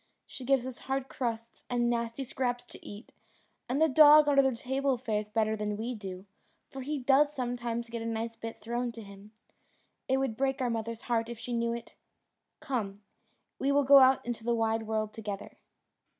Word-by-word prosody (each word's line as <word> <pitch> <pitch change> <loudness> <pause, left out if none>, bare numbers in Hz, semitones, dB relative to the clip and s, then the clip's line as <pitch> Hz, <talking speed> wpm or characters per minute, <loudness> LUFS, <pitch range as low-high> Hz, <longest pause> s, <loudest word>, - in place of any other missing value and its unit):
She 260 - -9
gives 265 -1 +2
us 260 -2 -7
hard 270 0 -3
crusts 230 -2 -4
and 240 -1 +1
nasty 235 +2 -1
scraps 245 -1 -2
to - - -14
eat, 205 +4 -10 0.6
and 260 +3 0
the 320 - +5
dog 300 +1 +8
under 280 -1 +5
the 265 -2 +1
table 265 +2 -1
fares 215 -3 -2
better 220 0 +1
than 210 -1 -3
we 235 +3 -3
do, 190 -4 -8 0.5
for 270 - -7
he 295 +3 -3
does 275 +3 +4
sometimes 240 -2 -3
get 230 -1 -4
a - - -5
nice 225 0 -3
bit 225 0 -8
thrown 240 +2 -2
to 225 -1 -9
him. 200 +1 -13 0.8
It 265 - +2
would 265 -4 -1
break 270 +2 0
our 250 -2 0
mother's 230 0 -4
heart 230 -1 0
if 235 - -6
she 240 +2 -5
knew 235 0 0
it! 235 0 -7 0.7
Come, 215 -9 -3 0.6
we 275 - +1
will 285 0 +4
go 275 +1 +8
out 260 0 +5
into 240 -2 -4
the 235 +1 +1
wide 225 -1 0
world 215 -1 -1
together." 205 -3 -7
235 Hz, 195 wpm, -30 LUFS, 225-265 Hz, 0.8 s, dog